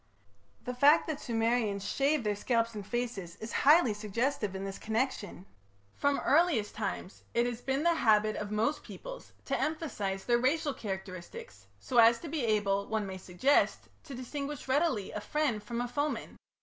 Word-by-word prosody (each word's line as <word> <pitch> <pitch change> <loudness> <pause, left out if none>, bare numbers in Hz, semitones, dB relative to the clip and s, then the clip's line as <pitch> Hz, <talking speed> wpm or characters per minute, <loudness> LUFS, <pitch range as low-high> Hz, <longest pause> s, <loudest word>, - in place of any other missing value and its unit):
The 250 - -4
fact 280 +5 +5
that 310 -2 -3
the - - -11
Sumerians 225 -3 0
shaved 280 0 +1
their 210 -1 0
scalps 230 +2 0
and 210 -2 -6
faces 210 -6 -4
is 220 +2 -7
highly 295 -5 +5
suggestive 210 0 -2
in 190 +1 -4
this 195 0 -6
connection. 220 -5 -2 0.5
From 285 0 +1
the - - -4
earliest 290 -9 +3
times 210 -3 -4
it 235 +1 +3
has 245 -1 -3
been 270 +3 -1
the 340 0 +4
habit 215 -7 +3
of 210 - -4
most 220 +8 0
peoples - - -9
to - - -1
emphasize 220 -12 -2
their 240 -1 +3
racial 285 +3 +1
characteristics 190 - -7
so 245 -2 +1
as 230 +1 +7
to 330 - -6
be 305 -3 -2
able, 200 -3 +1
one 220 -1 -1
may 190 -1 -6
suggest, 185 +11 +1 0.2
to 280 -4 -8
distinguish 280 +3 -5
readily 265 - +1
a 210 - -5
friend 285 -5 0
from 235 +3 -4
a 245 - -2
foeman. 290 +4 -3
235 Hz, 175 wpm, -31 LUFS, 210-285 Hz, 0.5 s, as